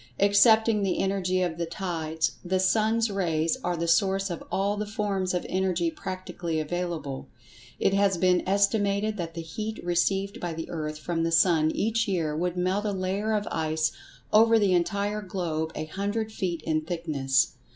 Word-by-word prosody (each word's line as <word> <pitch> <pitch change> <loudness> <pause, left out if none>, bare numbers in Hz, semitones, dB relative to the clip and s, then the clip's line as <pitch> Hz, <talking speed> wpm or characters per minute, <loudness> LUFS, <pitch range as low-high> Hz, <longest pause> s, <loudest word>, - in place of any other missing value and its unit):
Excepting 220 +2 +5
the 195 -2 0
energy 185 -1 0
of 170 -2 -3
the 170 - -1
tides, 160 -3 -2
the 185 +1 0
sun's 220 +3 +2
rays 165 -4 0
are 175 -1 -1
the 170 +1 -2
source 195 +2 +2
of 170 - -5
all 200 +2 +1
the 210 0 -3
forms 200 -3 -1
of 180 - -2
energy 180 -3 0
practically 175 -3 -4
available. 160 -4 -4 0.5
It 195 - +2
has 195 -2 +3
been 180 0 +3
estimated 200 +1 +2
that 165 -2 -5
the 165 - -4
heat 215 +7 -5
received 195 +5 0
by 175 -2 -4
the 165 - -6
earth 155 -2 -4
from 165 +2 -2
the 165 0 0
sun 165 -2 +4
each 225 +2 0
year 165 -6 -1
would 175 +2 -2
melt 185 +4 0
a 210 - 0
layer 195 +3 -1
of 210 -1 -1
ice 160 0 0 0.4
over 225 +1 +6
the 200 -4 +3
entire 200 +4 0
globe 170 -5 -3
a 155 - -3
hundred 205 +6 -3
feet 175 -6 -3
in 155 -1 0
thickness. 150 -6 0
185 Hz, 170 wpm, -27 LUFS, 165-200 Hz, 0.5 s, over